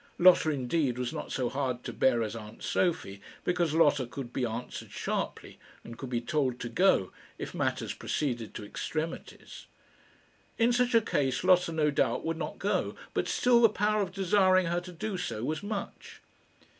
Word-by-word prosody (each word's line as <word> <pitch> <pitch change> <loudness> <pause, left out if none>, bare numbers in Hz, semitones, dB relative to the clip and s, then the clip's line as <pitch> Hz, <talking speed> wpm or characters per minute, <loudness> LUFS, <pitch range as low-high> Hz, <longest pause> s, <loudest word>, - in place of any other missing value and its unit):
Lotta, 175 -3 +6
indeed, 135 -2 0
was 125 -1 -2
not - - -6
so 125 - 0
hard 130 -2 -2
to - - -5
bear 120 -3 +3
as 110 +1 -4
aunt 110 -1 -9
Sophie, 100 - -1 0.2
because 175 -3 0
Lotta 145 -5 +4
could 125 -1 -7
be 130 - -1
answered 115 +2 -6
sharply, - - -4 0.2
and 115 - -9
could 130 +2 -7
be 120 -2 0
told 130 -1 -1
to 120 - -4
go, 120 - +3 0.3
if - - -6
matters - - -1
proceeded 120 -7 -3
to 105 - -6
extremities. 155 +9 -5 0.9
In 235 +1 +3
such 245 0 +2
a 230 - +7
case 135 - 0
Lotta 180 -2 +4
no 155 -2 +2
doubt 130 -4 0
would 165 0 -1
not - - -4
go; - - -1 0.2
but - - 0
still 245 -1 +4
the 230 - +7
power 210 0 +1
of 190 -2 -2
desiring 185 -1 +3
her 175 +1 0
to 180 +1 -10
do 190 +3 -4
so 115 -11 -3
was 155 +4 -2
much. 205 0 -6
155 Hz, 180 wpm, -29 LUFS, 125-185 Hz, 0.9 s, a